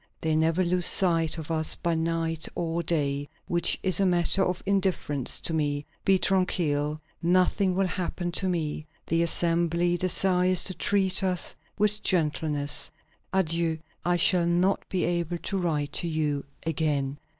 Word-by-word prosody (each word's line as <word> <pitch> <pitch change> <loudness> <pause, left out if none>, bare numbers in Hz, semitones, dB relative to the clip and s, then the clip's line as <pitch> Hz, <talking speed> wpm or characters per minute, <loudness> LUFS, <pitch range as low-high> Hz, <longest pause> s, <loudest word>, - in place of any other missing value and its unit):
They 160 -1 0
never 165 +3 +2
lose 180 0 +3
sight 165 -4 +3
of 160 0 -6
us 160 -1 +2
by 170 - -1
night 165 0 -1
or 170 0 -2
day; 145 -4 -1 0.2
which 175 0 +1
is 185 -2 +3
a 195 - +3
matter 175 +2 +3
of 180 -1 -2
indifference 185 -9 -1
to 165 - -2
me. 145 -2 -1 0.2
Be 195 -1 +4
tranquil; 155 -6 0 0.2
nothing 185 +2 +2
will 195 +1 +2
happen 180 -1 -3
to 190 +2 -1
me. 155 -3 -3 0.2
The 165 +1 +1
Assembly 170 +1 +1
desires 185 0 +2
to 185 - -1
treat 190 0 +1
us 185 -2 0 0.2
with 210 0 +2
gentleness. 150 -4 -1 0.4
Adieu. 165 -3 0 0.3
I 175 0 +1
shall 175 0 +4
not 180 +3 +2
be 185 - -1
able 175 0 -1
to 195 +3 -3
write 150 -5 -2
to 170 - -1
you 150 -3 -1 0.2
again." 145 -3 -1
170 Hz, 150 wpm, -26 LUFS, 155-185 Hz, 0.4 s, Be